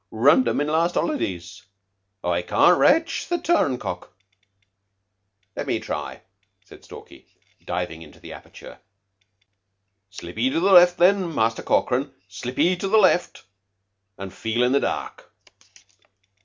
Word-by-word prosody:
Runned 130 +4 +3
'em 115 +3 0
in 145 - 0
last 165 +3 0
holidays. 95 - -3 0.6
I 90 0 -1
can't 175 - +3
rache 325 0 +2
the 350 - 0
turncock." 130 - -2 1.4
"Let - - -5
me - - -1
try," - - -6 0.4
said - - -17
Stalky, - - -14 0.4
diving 85 -3 -5
into 75 -3 -15
the - - -11
aperture. - - -14 1.3
"Slip 90 0 -10
'ee 125 +3 +2
to 150 - -1
the 195 +3 +1
left, 175 0 +6
then, 185 0 +2
Muster 115 0 0
Corkran. 130 +3 0 0.2
Slip 105 +6 -8
'ee 180 +1 +2
to 195 - -4
the 215 +3 +3
left, 185 -4 +2 0.7
an' 95 -1 -8
feel 115 +3 -2
in 125 - +2
the 140 - +3
dark." - - -5
130 Hz, 135 wpm, -22 LUFS, -, 1.4 s, left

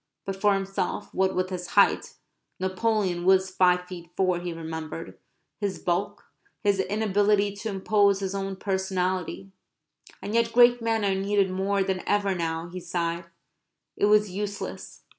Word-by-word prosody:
But 195 - -3
for 200 +1 +3
himself, 195 0 -3
what 190 0 +1
with 185 +1 -1
his 180 -1 -4
height - - +4 0.4
(Napoleon 190 -1 0
was 190 0 +4
five 180 -1 +3
feet 175 -2 -9
four, 185 -2 +2
he 175 0 -4
remembered), 160 0 -6 0.4
his 200 -2 -2
bulk, 180 +3 -2 0.4
his 200 -2 +2
inability 205 0 +1
to 220 +2 -4
impose 200 0 +2
his 195 -1 -3
own 195 0 -3
personality 190 -1 -2 0.7
(and 205 - -5
yet 230 0 +2
great 245 0 +6
men 225 -2 0
are 195 - +2
needed 195 0 +1
more 195 +1 0
than 190 -1 -2
ever 205 -1 +2
now, 165 -1 -2
he 185 +1 -6
sighed), 170 -1 -3 0.7
it - - +2
was 210 -1 +4
useless. 205 +2 -6
190 Hz, 150 wpm, -26 LUFS, 180-205 Hz, 0.7 s, great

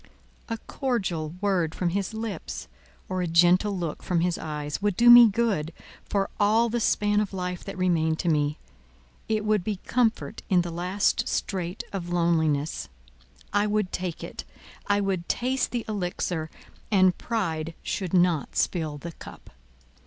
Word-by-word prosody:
A 230 - -2
cordial 190 - -2
word 180 -6 +1
from 180 - 0
his 195 +3 -2
lips, 220 -5 -5 0.4
or 185 0 -2
a 180 - -1
gentle 180 +4 +4
look 170 -4 -4
from 175 -2 0
his 175 0 +1
eyes, 150 0 -4
would 205 -2 0
do 240 0 +8
me 240 -1 +11
good, 205 -8 0 0.4
for 195 -1 +1
all 220 +3 +4
the 240 +2 -1
span 210 -2 +2
of 205 -2 -2
life 180 -1 -4
that 195 - -6
remained 165 -3 +1
to 175 - -3
me; 150 -2 +1 0.7
it 215 -1 0
would 210 -3 +2
be 210 +1 -1
comfort 235 -2 0
in 185 -3 +4
the 175 - -5
last 180 +4 0
strait 180 -2 -2
of 175 -3 -4
loneliness; 160 -4 +1 0.6
I 205 +1 +3
would 210 -3 0
take 180 -3 -4
it—I 205 0 -4
would 190 -3 -2
taste 255 +2 0
the 240 -2 -3
elixir, 180 -5 -2 0.4
and 185 -4 +4
pride 165 -8 -2
should 185 -4 -3
not 175 -4 +2
spill 155 -4 0
the 170 +4 -7
cup. - - -13
185 Hz, 155 wpm, -26 LUFS, 170-210 Hz, 0.7 s, me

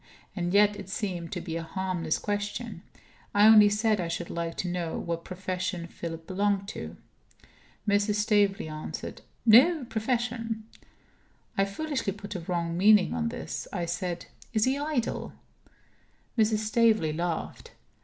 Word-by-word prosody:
And 175 -2 -1
yet 205 +1 +5
it 195 -2 -8
seemed 180 -5 -3
to 175 - -3
be 165 -1 -5
a - - -3
harmless 175 -1 -2
question; 205 -1 -3 0.5
I 205 +1 +7
only 215 -1 +9
said 210 -1 +2
I 170 - -2
should 170 +1 -4
like 170 0 -3
to 185 - -2
know 175 -2 -2
what 170 0 -3
profession 185 -1 -3
Philip 165 -1 -7
belonged 200 +1 0
to. - - -7 0.9
Mrs. 205 +1 +2
Staveley 205 -4 +2
answered: 155 0 -6 0.2
"No 260 +8 +7
profession." 230 -1 -2 0.9
I 195 - +3
foolishly 260 0 -2
put 205 0 -8
a 185 - -3
wrong 170 -1 -2
meaning 200 +1 +5
on 230 -1 0
this. 245 - -5
I 175 -4 -2
said: 175 0 -3 0.3
"Is 215 -2 +3
he 260 +1 +2
idle?" 285 -4 -2 1.0
Mrs. 220 -2 +3
Staveley 215 -7 +3
laughed. 170 0 -4
200 Hz, 145 wpm, -28 LUFS, 175-220 Hz, 1.0 s, only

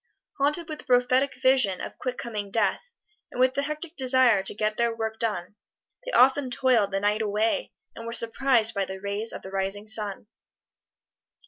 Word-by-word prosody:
Haunted 300 +4 0
with 310 -1 -7
the - - -12
prophetic 255 +2 +2
vision 260 -8 +3
of - - -8
quick 250 -1 -4
coming 210 -4 -5
death, 230 - 0 0.4
and - - -9
with 255 0 +4
the 280 - -1
hectic 305 +3 -5
desire 255 -5 +4
to 190 - -2
get 215 0 -1
their 235 0 0
work 220 -1 -4
done, 205 -4 -2 0.5
they - - -6
often 265 +1 +4
toiled 245 -5 +2
the 195 - 0
night 210 +2 0
away 215 - 0 0.2
and 230 - -8
were - - -4
surprised 230 0 +2
by 200 - 0
the 190 0 -6
rays 200 +3 -2
of - - -8
the 190 - -9
rising 195 +2 -3
sun. 215 -2 0
230 Hz, 185 wpm, -26 LUFS, 205-260 Hz, 0.5 s, with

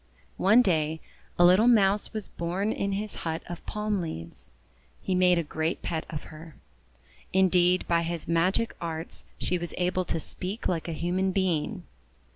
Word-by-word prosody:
One 215 +6 +6
day 160 -4 +1 0.4
a 175 - +6
little 185 +6 +6
Mouse 205 -4 +4
was 215 -2 -5
born 180 +5 -2
in 200 -2 -1
his 210 +1 -3
hut 160 -1 -3
of 175 - -8
palm 210 -2 -1
leaves. 85 - -7 0.5
He 190 - -2
made 180 -1 +4
a 170 - +1
great 160 +2 -2
pet 160 -2 -3
of 150 - -5
her. 155 0 -11 0.8
In 190 0 +5
deed, 180 0 +3
by 170 -1 +3
his 170 -1 -4
magic 180 +7 +1
arts 165 -1 -6
she 180 - -1
was 175 0 -5
able 180 0 0
to 165 - -2
speak 190 +7 -5
like 170 -2 -1
a - - -3
human 180 +4 0
being. 185 -5 -1
180 Hz, 170 wpm, -27 LUFS, 165-195 Hz, 0.8 s, One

